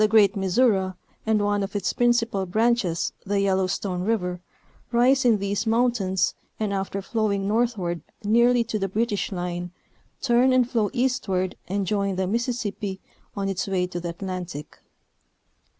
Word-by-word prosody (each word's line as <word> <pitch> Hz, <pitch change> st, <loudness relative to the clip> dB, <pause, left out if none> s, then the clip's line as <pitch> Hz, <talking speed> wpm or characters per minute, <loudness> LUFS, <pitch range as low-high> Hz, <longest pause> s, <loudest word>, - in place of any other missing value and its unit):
great 210 Hz, -2 st, +5 dB
Missouri 195 Hz, -1 st, +2 dB, 0.3 s
and 215 Hz, -2 st, +2 dB
one 205 Hz, 0 st, +1 dB
of 195 Hz, +1 st, -4 dB
its 200 Hz, -2 st, 0 dB
principal 235 Hz, -5 st, +1 dB
branches, 215 Hz, -3 st, +1 dB
the 200 Hz, 0 st, 0 dB
Yellowstone 190 Hz, -1 st, 0 dB
River, 180 Hz, -3 st, -1 dB, 0.5 s
rise 255 Hz, +3 st, +4 dB
in 230 Hz, -3 st, +5 dB
these 200 Hz, +2 st, -2 dB
mountains 225 Hz, -5 st, +2 dB, 0.3 s
and 210 Hz, -2 st, -1 dB
after 195 Hz, 0 st, -3 dB
flowing 200 Hz, -3 st, 0 dB
northward 210 Hz, -6 st, 0 dB, 0.2 s
nearly 235 Hz, +3 st, +4 dB
to 220 Hz, -1 st, -3 dB
the 195 Hz, 0 st, -1 dB
British 210 Hz, +1 st, -1 dB
line 175 Hz, -1 st, -3 dB, 0.5 s
turn 255 Hz, 0 st, +3 dB
and 255 Hz, -2 st, +4 dB
flow 225 Hz, -5 st, +1 dB
eastward 195 Hz, -8 st, 0 dB
and 200 Hz, +1 st, -1 dB
join 200 Hz, 0 st, 0 dB
the 190 Hz, 0 st, 0 dB
Mississippi 215 Hz, -2 st, -2 dB, 0.4 s
on 195 Hz, 0 st, -1 dB
its 195 Hz, 0 st, -2 dB
way 185 Hz, -2 st, +1 dB
to 180 Hz, -1 st, -5 dB
the 175 Hz, 0 st, -4 dB
Atlantic. 175 Hz, -4 st, -6 dB
200 Hz, 145 wpm, -25 LUFS, 190-230 Hz, 0.5 s, great